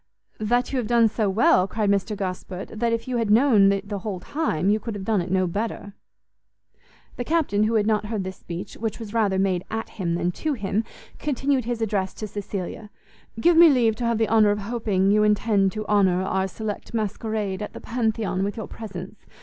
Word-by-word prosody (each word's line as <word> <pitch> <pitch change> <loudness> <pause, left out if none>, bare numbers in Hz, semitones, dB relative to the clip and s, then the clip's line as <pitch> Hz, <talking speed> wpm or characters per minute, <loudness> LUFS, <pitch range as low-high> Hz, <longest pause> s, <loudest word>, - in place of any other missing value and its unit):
"That 240 +3 +1
you - - +1
have 235 - -2
done 235 -1 +4
so 215 -1 0
well," 190 -2 +4
cried 210 -1 0
Mr 200 +1 0
Gosport, 185 -1 -5
"that 230 +1 -1
if 230 +2 -2
you 250 -1 -1
had 225 -3 0
known 215 -3 +5
it 200 0 -2
the 205 -1 -3
whole 195 -2 -4
time, 195 - 0
you 215 - +2
could 225 0 -5
have 195 -2 -6
done 215 -3 +2
it 175 - -5
no 185 0 +2
better." 205 +2 -4 1.2
The 245 - -2
Captain, 275 -9 +1
who 225 +1 0
had 210 -2 +3
not 210 -1 +1
heard 210 -3 -2
this 190 0 -6
speech, 175 +3 -7
which 225 -1 -3
was 225 -2 -8
rather 210 -4 +2
made 190 -2 +1
at 225 0 -4
him 170 -4 -2
than 175 +1 0
to 310 - -2
him, 215 -2 -1 0.3
continued 275 -3 0
his 235 -1 -2
address 195 -3 -1
to 215 - -5
Cecilia; 205 0 -6 0.5
"Give 345 +8 +4
me 335 0 +9
leave 235 -6 +3
to 240 - -2
have 235 -1 +1
the 225 0 +2
honour 220 -2 +4
of 205 - +1
hoping 200 -3 0
you 210 +1 +4
intend 210 -2 +2
to 215 -1 -4
honour 190 -3 +3
our 190 0 0
select 215 +3 -6
masquerade 215 -2 -2
at 210 - -5
the - - -8
Pantheon 220 -5 -1
with 200 +2 -3
your 220 - -5
presence. 195 -2 -9
210 Hz, 215 wpm, -24 LUFS, 195-230 Hz, 1.2 s, me